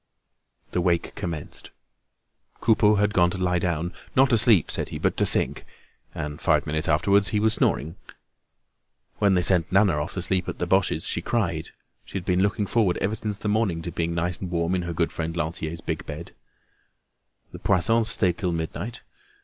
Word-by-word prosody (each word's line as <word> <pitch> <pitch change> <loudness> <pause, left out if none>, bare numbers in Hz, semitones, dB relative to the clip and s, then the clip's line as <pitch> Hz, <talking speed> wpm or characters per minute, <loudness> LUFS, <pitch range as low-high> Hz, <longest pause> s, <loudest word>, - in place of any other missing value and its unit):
The 90 - 0
wake 85 -1 0
commenced. 80 -4 -6 0.9
Coupeau 105 -2 +4
had 105 +1 +1
gone 90 -3 +4
to 90 - -4
lie 90 -1 +1
down, 85 0 -2 0.2
not 135 0 +5
to 115 - +5
sleep, 110 -8 +4
said - - -2
he, - - -5
but - - 0
to - - +2
think; - - 0 0.5
and 75 0 -5
five - - +2
minutes 80 +2 -1
afterwards 100 +6 +3
he 105 - 0
was 110 +1 +3
snoring. 80 +6 0 1.2
When 100 -2 +3
they 90 - +2
sent 85 -2 +2
Nana 95 -6 +3
off - - -5
to 95 - -3
sleep 95 0 -1
at - - -5
the - - -2
Boches' 90 -3 +1
she - - -2
cried; - - -1 0.3
she - - -6
had 90 - -6
been 90 -1 +2
looking 100 +1 +1
forward 100 -5 +1
ever 100 - -1
since 105 -2 -3
the 105 - -5
morning 105 -6 0
to 85 - -5
being 85 0 -2
nice 85 +1 -1
and 95 - -5
warm 85 0 -1
in 90 - 0
her 85 -1 -4
good 85 0 0
friend 80 +1 -4
Lantier's 80 0 -2
big - - -4
bed. 80 +4 -7 1.2
The - - -9
Poissons 115 +5 +3
stayed 90 -5 +1
till 90 -2 -1
midnight. 85 +8 -4
90 Hz, 190 wpm, -25 LUFS, 85-100 Hz, 1.2 s, not